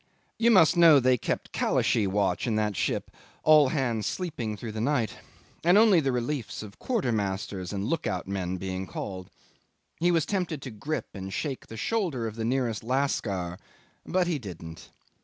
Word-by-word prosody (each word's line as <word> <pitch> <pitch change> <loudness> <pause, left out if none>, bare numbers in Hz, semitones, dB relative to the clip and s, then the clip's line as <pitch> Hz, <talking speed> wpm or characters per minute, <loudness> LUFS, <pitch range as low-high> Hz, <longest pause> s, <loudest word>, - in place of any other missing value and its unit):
'You 235 - +4
must 185 -8 +6
know 165 -4 +8
they 130 0 +4
kept - - -3
Kalashee 110 -5 +2
watch 95 +1 0
in 115 - +1
that 105 -1 0
ship, - - -1 0.3
all 155 -3 +6
hands 120 -6 -1
sleeping 125 - -3
through 110 +2 -6
the 110 0 -4
night, 125 -3 0 0.5
and 175 +4 +5
only 215 -5 +6
the 135 -4 +1
reliefs 125 -2 -3
of 100 -2 -12
quartermasters 100 - -2
and 100 -1 -3
look 165 +8 -1
out 90 -1 -3
men 95 -2 -2
being 95 0 -4
called. 95 -1 -6 0.7
He 175 +2 +3
was 165 -4 +2
tempted 180 -5 -2
to 130 - -6
grip 145 +9 -4
and 95 -1 -6
shake 135 +6 -4
the 115 - -9
shoulder 165 - -1
of 110 - -3
the 115 - -4
nearest 120 -3 0
lascar, 105 -9 -1 0.4
but 185 -1 +1
he 170 -4 -1
didn't. 85 -7 -9
120 Hz, 175 wpm, -27 LUFS, 100-155 Hz, 0.7 s, know